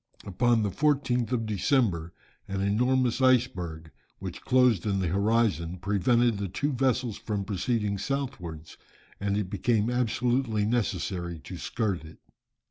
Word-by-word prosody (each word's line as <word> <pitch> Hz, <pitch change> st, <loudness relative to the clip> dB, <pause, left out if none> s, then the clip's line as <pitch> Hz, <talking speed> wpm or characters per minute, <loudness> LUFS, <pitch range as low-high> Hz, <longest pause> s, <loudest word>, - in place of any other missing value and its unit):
Upon 115 Hz, +3 st, +2 dB
the 100 Hz, -, 0 dB
14th 130 Hz, -2 st, +1 dB
of 115 Hz, -3 st, 0 dB
December, 100 Hz, -, +1 dB, 0.4 s
an 95 Hz, 0 st, -3 dB
enormous 120 Hz, +5 st, +1 dB
iceberg, 90 Hz, -11 st, +1 dB, 0.3 s
which -, -, -7 dB
closed 125 Hz, -7 st, +3 dB
in 100 Hz, -1 st, +1 dB
the 95 Hz, -3 st, 0 dB
horizon, 100 Hz, -3 st, +1 dB
prevented 105 Hz, +4 st, +2 dB
the 100 Hz, -, -2 dB
two 145 Hz, +11 st, -2 dB
vessels 125 Hz, -3 st, 0 dB
from 100 Hz, -3 st, -3 dB
proceeding 105 Hz, 0 st, -1 dB
southwards, 95 Hz, -, -4 dB, 0.4 s
and 100 Hz, 0 st, 0 dB
it 100 Hz, -3 st, -2 dB
became 115 Hz, -1 st, +1 dB
absolutely 120 Hz, -2 st, +1 dB
necessary 95 Hz, -6 st, -1 dB
to 90 Hz, -, -8 dB
skirt 100 Hz, -1 st, -2 dB
it. 80 Hz, 0 st, -12 dB
105 Hz, 130 wpm, -28 LUFS, 95-125 Hz, 0.4 s, closed